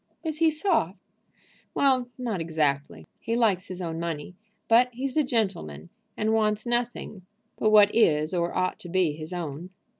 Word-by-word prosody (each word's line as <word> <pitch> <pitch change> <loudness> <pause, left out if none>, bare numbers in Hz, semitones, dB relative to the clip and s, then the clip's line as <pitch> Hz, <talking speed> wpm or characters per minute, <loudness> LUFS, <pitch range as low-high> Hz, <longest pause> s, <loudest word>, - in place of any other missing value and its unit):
"Is 315 -2 -3
he 325 -1 +5
soft?" 305 - 0 0.8
"Well, 260 -3 +2
not 230 -8 -3
exactly. 140 - -1
He 230 - -2
likes 205 -6 +2
his 185 0 -6
own 165 -1 -4
money. 165 0 -4 0.3
But 240 +2 +5
he's 260 +2 -4
a 310 - +4
gentleman, 180 - -2 0.3
and 220 +1 +1
wants 215 0 +1
nothing 240 -5 -3 0.3
but 215 - +1
what 210 -1 +6
is 155 -8 +3
or 175 -1 0
ought 185 - -1
to 175 - -9
be 180 -3 +2
his 155 +2 -7
own." 170 -1 -5
190 Hz, 160 wpm, -26 LUFS, 165-240 Hz, 0.8 s, what